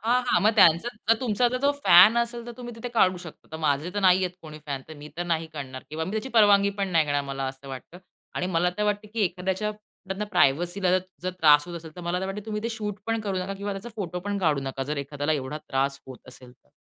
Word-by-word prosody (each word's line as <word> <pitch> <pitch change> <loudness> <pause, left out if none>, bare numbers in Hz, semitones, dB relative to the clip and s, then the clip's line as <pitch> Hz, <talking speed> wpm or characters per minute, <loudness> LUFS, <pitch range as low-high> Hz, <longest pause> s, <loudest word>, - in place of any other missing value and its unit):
हां, 245 +3 +2
हां, - - +3
मग 215 - +6
त्यांचं 170 +3 +6 0.2
जर 225 - +7
तुमचा 240 0 +2
ज - - -9
आता 255 - 0
तो 285 - +4
फॅन 185 +7 +8
असेल 235 0 -2
तर 240 - -6
तुम्ही 240 -2 -8
तिथे 230 +2 -5
काढू 185 -4 +4
शकता. 170 -3 -11
आता 160 - -7
माझे 145 +3 +1
तर 205 - -1
नाहीये 185 -1 +4
कोणी 155 -1 -10
फॅन, 140 -2 -4
तर 160 - -9
मी 150 - -9
तर 175 - -2
नाही 165 0 -1
काढणार. 130 -3 -7
किंवा 160 +1 -3
मी 185 - -5
त्याची 220 +4 -3
परवानगी 200 -1 +5
पण 195 - 0
नाही 165 -3 +3
घेणार, 145 0 0
मला 135 0 -4
असं 135 +1 -8
वाटतं 135 +6 -9 0.4
आणि 180 - -1
मला 180 +1 +3
तर 210 - +1
वाटतं 210 0 -1
की 225 - +1
एखाद्याच्या 190 +4 -2
म्हणतात 200 -2 -10
ना, 210 - -1
प्रायव्हसीला 175 +4 +2
जर 185 - +4 0.2
जर 185 - -1
त्रास 150 -1 +6
होत 175 - -6
असेल, 160 -2 -10
तर - - -7
मला 175 +1 -2
तर 190 - -2
वाटतं 200 +2 -6
तुम्ही 210 0 -3
ते 230 - -1
शूट 210 -2 -3
पण 225 0 0
करू 195 -3 -2
नका 185 +2 -4
किंवा 200 +1 -4
त्याचा 195 +4 -7
फोटो 180 -3 -4
पण 205 +1 -3
काढू 155 -7 +1
नका. 135 0 -4
जर 150 +2 -3
एखाद्याला 145 +2 -2
एवढा 145 +1 -3
त्रास 135 +1 -1
होत 130 -1 -12
असेल 125 -1 -12
तर. - - -32
180 Hz, 265 wpm, -26 LUFS, 150-210 Hz, 0.4 s, फॅन